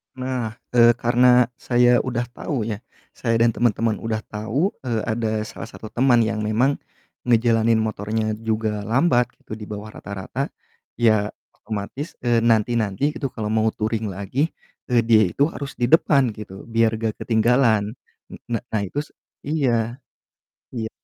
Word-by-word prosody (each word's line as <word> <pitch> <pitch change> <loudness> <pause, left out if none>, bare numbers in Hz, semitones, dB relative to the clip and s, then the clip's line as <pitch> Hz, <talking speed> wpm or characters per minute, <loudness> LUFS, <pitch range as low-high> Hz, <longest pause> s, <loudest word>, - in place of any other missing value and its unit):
Nah, 125 -4 -3 0.2
eee, 120 -1 +6
karena 125 +1 +4
saya 120 0 +4
udah 120 -2 -1
tahu 125 0 -3
ya 105 - -4 0.4
saya 115 -2 0
dan 115 - +5
teman-teman 115 -1 +1
udah 110 -1 -2
tahu, 115 - -1
eee, 115 -3 0
ada 110 -1 -1
salah 110 - -8
satu 110 -1 -10
teman 120 -1 +4
yang 110 -1 -1
memang 110 +6 +1 0.5
ngejalanin 115 -1 +3
motornya 110 0 -1
juga 110 -2 -2
lambat 125 +1 +3 0.2
gitu 110 - -8
di 105 - -8
bawah 105 +1 -7
rata-rata, 100 +7 -4 0.5
ya 110 -3 +3 0.2
otomatis, 110 - -6
eee, 120 -2 +3
nanti-nanti 115 +3 +2
itu 140 - -2
kalo 110 -2 -3
mau 110 0 +2
touring 110 +1 -2
lagi, 100 - -1 0.4
eee, 120 -2 +3
dia 110 -1 +5
itu 145 +3 +2
harus 140 -4 -6
di 120 -1 0
depan 140 -4 +4
gitu 105 -2 -10
biar 115 0 +2
gak 110 -1 -2
ketinggalan. 110 -2 +2 0.4
N - - -7
na 115 -2 -1
nah 110 - 0
itu 145 +10 -4 0.3
iya, 125 -6 0 0.8
iya. 110 -2 -3
115 Hz, 150 wpm, -22 LUFS, 110-125 Hz, 0.8 s, eee